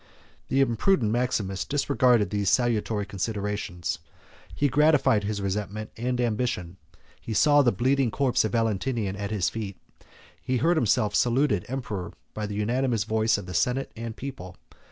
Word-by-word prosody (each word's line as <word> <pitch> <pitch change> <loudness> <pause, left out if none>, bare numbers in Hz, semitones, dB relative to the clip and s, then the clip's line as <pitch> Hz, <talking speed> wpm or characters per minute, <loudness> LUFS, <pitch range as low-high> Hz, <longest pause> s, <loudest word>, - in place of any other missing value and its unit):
The 135 - +2
imprudent 120 - +2
Maximus 110 -5 -1
disregarded 125 -7 +2
these 100 -2 +1
salutary 110 -3 +1
considerations; 100 -4 -3 0.6
he 145 - +2
gratified 145 -6 +3
his 100 -1 -2
resentment 105 +2 -3
and 125 +2 -2
ambition; 110 -7 -1 0.4
he 110 - -5
saw 145 +3 +5
the 125 -4 +3
bleeding 130 +4 +1
corpse 130 +3 +1
of 110 - -1
Valentinian 115 -2 0
at 100 0 -4
his 105 -4 0
feet; 105 -4 -6 0.2
and - - -26 0.3
he 130 0 -1
heard 165 +7 +3
himself 110 -5 +2
saluted 120 -5 +2
Emperor 115 -8 -4 0.2
by 105 -1 -3
the 105 - -5
unanimous 115 +1 0
voice 110 +1 +1
of 100 - -7
the 90 - -7
senate 125 +8 0
and 115 -1 -6
people. 95 -10 -7
110 Hz, 155 wpm, -26 LUFS, 100-125 Hz, 0.6 s, saw